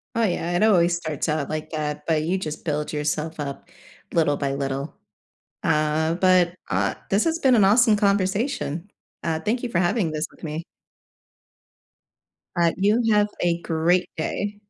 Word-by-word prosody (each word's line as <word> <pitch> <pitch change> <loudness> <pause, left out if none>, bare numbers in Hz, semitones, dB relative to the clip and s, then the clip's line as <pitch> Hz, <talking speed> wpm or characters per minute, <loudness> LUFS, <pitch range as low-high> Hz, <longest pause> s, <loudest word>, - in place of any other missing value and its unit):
Oh 230 - +2
yeah 175 -3 0
it 210 - +2
always 175 -5 +4
starts 155 -2 -3
out 150 -2 -1
like 155 0 -4
that, 150 -2 -4
but 155 -2 +1
you 180 +4 0
just 155 -2 -6
build 150 -1 -2
yourself 155 +1 -2
up 140 -1 -6 0.4
little 155 -3 +3
by 140 -1 -2
little. 140 +1 -3 0.7
Uh, 155 +2 +1
but, 180 -1 +3
ah - - 0
This 200 +2 +3
has 330 0 0
been 265 -5 +4
an 215 - +5
awesome 220 +2 +5
conversation, 200 - 0 0.3
uh, 160 -1 -1
thank 220 +9 -1
you 245 - -2
for 175 -7 0
having 175 -1 +1
this 155 +1 -2
with - - -21
me. 155 +1 -4 1.9
Right. 170 -1 +3
You 210 +5 +3
have 210 0 +4
a 170 -1 +1
great 170 +3 +1
day. 205 +6 -3
170 Hz, 165 wpm, -24 LUFS, 155-200 Hz, 1.9 s, an